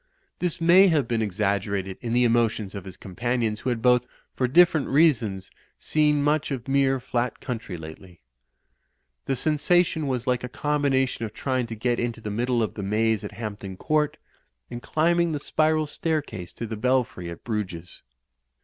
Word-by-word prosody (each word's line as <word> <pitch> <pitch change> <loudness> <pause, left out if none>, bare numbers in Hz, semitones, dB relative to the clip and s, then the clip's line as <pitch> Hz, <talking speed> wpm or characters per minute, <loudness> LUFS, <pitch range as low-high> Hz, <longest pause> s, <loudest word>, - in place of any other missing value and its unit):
This 180 0 -1
may 175 +4 +6
have 150 -8 +2
been 115 -1 0
exaggerated 100 -2 -1
in 115 - -4
the 125 +1 +3
emotions 115 -4 +1
of 100 -2 -7
his 95 -1 -10
companions, 115 +2 -2
who 130 - -2
had 115 -2 -2
both, 125 -1 +4 0.3
for 130 - 0
dif 170 +7 +6
ferent 155 -4 -2
reasons, 120 - +2 0.3
seen 150 -1 +2
much 150 0 +1
of 130 -3 -4
mere 135 -1 +2
flat 125 0 -2
country 115 -8 -5
lately. 80 +2 -11 1.1
The 135 - 0
sensation 160 +2 +2
was 125 -2 -2
like 125 -2 0
a 125 - -4
combination 135 -3 0
of 110 -1 -5
tryitijf 130 -3 -1
to 115 - -6
get 120 +2 0
into 120 -1 -2
the 110 -2 -5
middle 120 +2 0
of 110 - -3
the 105 - -6
maze 110 +2 +1
at 105 - -7
Hampton 100 -4 -6
Court, 150 +3 0 0.5
and 120 0 -6
climbing 170 +3 +1
the 145 - -2
spiral 155 +1 +1
staircase 145 - -3
to 115 - -5
the 110 0 -5
Belfry 125 -7 0
at 85 - -9
Bruges. 90 -6 -5
120 Hz, 175 wpm, -25 LUFS, 105-145 Hz, 1.1 s, may